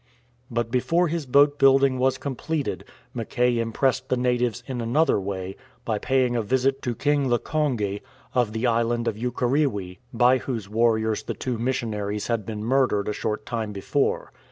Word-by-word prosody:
But 115 -1 -2
before 165 +7 +2
his 165 -3 -3
boat 145 +2 +4
building 135 -1 +5
was 130 0 +2
completed, 140 +3 -3 0.3
Mackay 120 +1 0
impressed 130 +3 0
the 130 - +1
natives 125 -1 0
in 130 -3 -4
another 130 +4 +2
way 95 0 -4 0.3
by 110 -2 -1
paying 130 -1 +1
a 120 - +1
visit 130 +5 +1
to 120 -2 -2
King 145 +1 +1
Lkonge, 120 -6 0 0.3
of 120 -4 +1
the 110 +3 -2
island 115 0 +1
of 115 - 0
Ukerewe, 120 -5 -1
by 125 +1 +4
whose 115 -6 -4
warriors 110 0 +1
the - - -5
two 125 -3 -3
missionaries 110 -5 -2
had 115 -4 -2
been 105 -1 -4
murdered 120 -4 +1
a - - -1
short 105 +1 -3
time 110 -3 -3
before. 135 +8 -1
120 Hz, 160 wpm, -24 LUFS, 110-130 Hz, 0.3 s, building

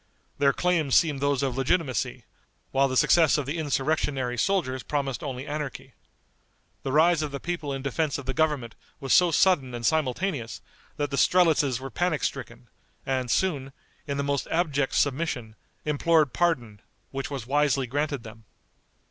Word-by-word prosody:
Their 140 -1 +5
claims 165 -5 +1
seemed 150 -5 +3
those 140 -1 +1
of 130 -3 -1
legitimacy, 135 - -1 0.5
while 135 +1 +3
the 130 -1 -1
success 160 +1 +5
of 145 - -2
the 150 +5 -3
insurrectionary 140 -3 -1
soldiers 130 - 0
promised 140 -3 -2
only 130 -2 -5
anarchy. 150 -2 -5 0.9
The 135 - -3
rise 160 +3 +4
of 150 - -2
the 140 0 -6
people 165 -2 -4
in 135 -1 -4
defense 145 +2 -1
of 140 - -8
the 130 - -2
government 150 -7 0 0.3
was 135 -3 0
so 180 -1 +6
sudden 150 -7 +2
and 120 -1 -5
simultaneous, 145 - -1 0.4
that 145 -1 -2
the 140 - -2
strelitzes 155 -9 +3
were 135 0 -7
panic 175 -3 -1
stricken, - - -4 0.4
and 130 -2 -1
soon, 140 -5 0 0.3
in 140 -1 -2
the 140 - -1
most 140 -1 -1
abject 145 -5 0
submission, 135 -6 -1 0.3
implored 150 -1 +2
pardon, 120 -12 0 0.3
which 135 0 -4
was 135 -5 -5
wisely 140 0 +2
granted 140 0 -2
them. 110 -1 -12
140 Hz, 160 wpm, -26 LUFS, 130-155 Hz, 0.9 s, so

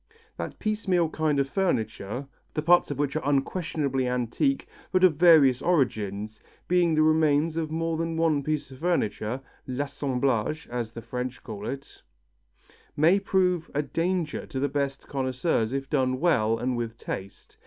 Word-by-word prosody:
That - - -6
piecemeal 195 -6 0
kind 155 -2 +1
of 140 - +1
furniture, 125 - -2 0.3
the 155 - -1
parts 175 +2 +5
of 145 - -3
which 145 0 -1
are 155 - 0
unquestionably 140 -2 0
antique 125 - 0 0.2
but 185 0 +2
of 185 -3 +7
various 150 -7 +6
origins, 110 - 0 0.3
being 175 -2 +3
the 155 - +4
remains 155 0 +3
of 160 -2 -2
more 165 +1 -1
than 165 0 -2
one 160 -3 +2
piece 150 -1 -2
of 130 - -11
furniture 130 -7 -1 0.3
l'assemblage, 135 0 -1
as 120 -2 -3
the 115 - -8
French 125 +2 -5
call 105 -3 -6
it 140 +1 -7 1.0
may 165 +7 +5
prove 180 -3 +1
a 145 - +1
danger 165 +1 -2
to 135 - -4
the 140 - +1
best 140 -1 -3
connoisseurs 130 -3 0
if 135 0 -3
done 130 -3 +1
well 115 -10 +2
and 125 +1 -1
with 115 -1 -4
taste. 95 -2 -7
145 Hz, 155 wpm, -27 LUFS, 125-165 Hz, 1.0 s, of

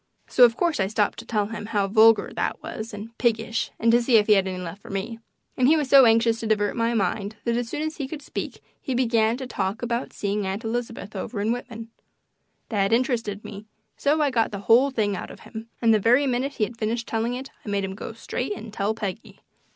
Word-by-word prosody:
So, 250 - +6
of 230 -1 +1
course, 340 -6 +1
I 190 - +2
stopped 210 0 0
to - - -10
tell 210 -3 0
him 210 -2 -6
how 205 -3 0
vulgar 220 +1 +5
that - - -2
was, 220 +1 -6
and 215 +2 -9
piggish, 230 -1 0
and 230 +1 +3
to 240 +1 +5
see 235 0 +2
if 210 - +4
he 210 - +5
had 195 -2 +3
left 185 -1 -4
any 175 -2 -6
for - - -13
me, 200 +4 -4 0.4
and 255 - +3
he 315 +3 +5
was 290 -3 -1
so 275 -1 +8
anxious 225 0 +3
to 225 - -4
divert 205 -1 +1
my 230 0 0
mind 205 0 -1
that 235 -1 0
as 240 -1 -2
soon 300 - -3
as 315 0 -4
he 280 -4 -3
could 295 +1 -7
speak - - -6 0.2
he 260 - -3
began 230 -2 +2
to 260 - -5
talk 200 -2 -3
about 235 +1 -2
seeing 200 -1 -2
Aunt 195 +4 -3
Elizabeth 230 -2 -4
over 200 +3 -4
in 210 +3 +1
Whitman. 230 -2 -6 0.8
That 200 -3 +1
interested 230 -4 0
me, 210 +1 -9 0.3
so 295 +2 +1
I 285 - +1
got 230 -3 +2
the 200 -1 -5
whole 235 +7 +5
thing 215 -6 0
out - - -6
of - - -12
him, 225 0 -9
and 225 -1 +5
the 215 - +4
very 245 +7 +4
minute 260 +2 -1
he 225 - -1
had 230 +2 -4
finished 225 +1 -1
telling 230 +2 -1
it 265 +2 -7
I - - -7
made 200 -1 0
him 190 0 -3
go 205 - -7
straight 230 +1 -4
and 220 -1 -9
tell 210 +1 -1
Peggy. 215 0 -6
225 Hz, 245 wpm, -24 LUFS, 210-245 Hz, 0.8 s, so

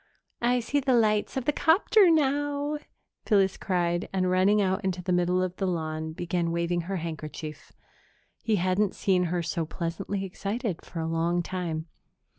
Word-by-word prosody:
"I 245 +1 +2
see 280 +5 0
the 260 -2 +2
lights 215 0 +2
of 260 - -2
the - - +3
'copter 350 +6 +4
now!" 290 -1 +1 0.5
Phyllis 195 -3 +3
cried 175 -1 -1
and, 185 -1 +1
running 190 +3 +4
out 190 +1 +1
into 185 -1 -2
the 180 - -2
middle 180 +1 +2
of 185 -1 -3
the 195 - -1
lawn, 160 -2 -3
began 170 0 -1
waving 170 +1 0
her 195 - -1
handkerchief. 155 -2 -6 0.7
He 225 -2 +1
hadn't 185 +2 +1
seen 185 -2 +2
her 175 0 -1
so 165 0 -1
pleasantly 170 +4 -3
excited 200 +1 -3
for 165 - -6
a 160 - -2
long 170 +2 0
time. 165 -3 -3
185 Hz, 165 wpm, -27 LUFS, 170-215 Hz, 0.7 s, copter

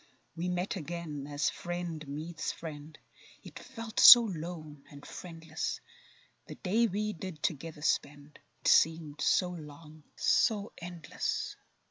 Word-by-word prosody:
We 175 +2 -2
met 180 +3 -2
again, 155 -4 -6
as 145 0 0
friend 175 -3 -5
meets 155 +4 -4
friend, 155 -1 -9 0.5
Yet - - -10
felt 230 -1 -6
so 240 -2 +12
lone 160 -6 -6
and 145 0 -13
friendless; 165 -2 -5 0.7
The - - -8
day 225 +5 +1
we 210 +1 -2
did 175 -3 -8
together 155 0 -3
spend, 145 -1 -2 0.2
It - - -3
seemed 160 -3 +3
so 180 -1 +2
long—so 155 - -1
endless. 170 -3 -4
165 Hz, 120 wpm, -31 LUFS, 150-180 Hz, 0.7 s, so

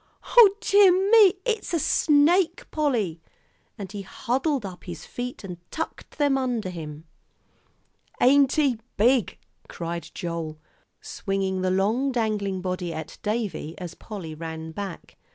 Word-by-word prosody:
"O 425 -5 +8
dear 400 -3 +6 0.2
me, 420 -4 +7
it's 445 -7 -1
a - - +1
snake, 325 +5 +3
Polly!" 230 - 0 0.6
and 195 -2 -7
he 205 -1 -5
huddled 260 - -1
up 185 -2 -9
his 170 -3 -8
feet 245 -1 -6
and 180 -3 -7
tucked 320 - -6
them 285 -2 +2
under 240 -7 -2
him. 155 -2 -8 1.1
"Ain't 275 +1 +5
he 275 -7 +2 0.2
big?" 240 +1 +3 0.3
cried 170 0 -5
Joel, 165 -3 -4 0.4
swinging 195 -1 -2
the 185 - +1
long 215 +9 +1
dangling 210 -5 -1
body 180 -2 -3
at 160 -2 -7
Davie 210 -7 -3
as 175 -2 -7
Polly 185 -7 -8
ran 160 0 -6
back. 195 +1 -7
210 Hz, 135 wpm, -25 LUFS, 175-280 Hz, 1.1 s, O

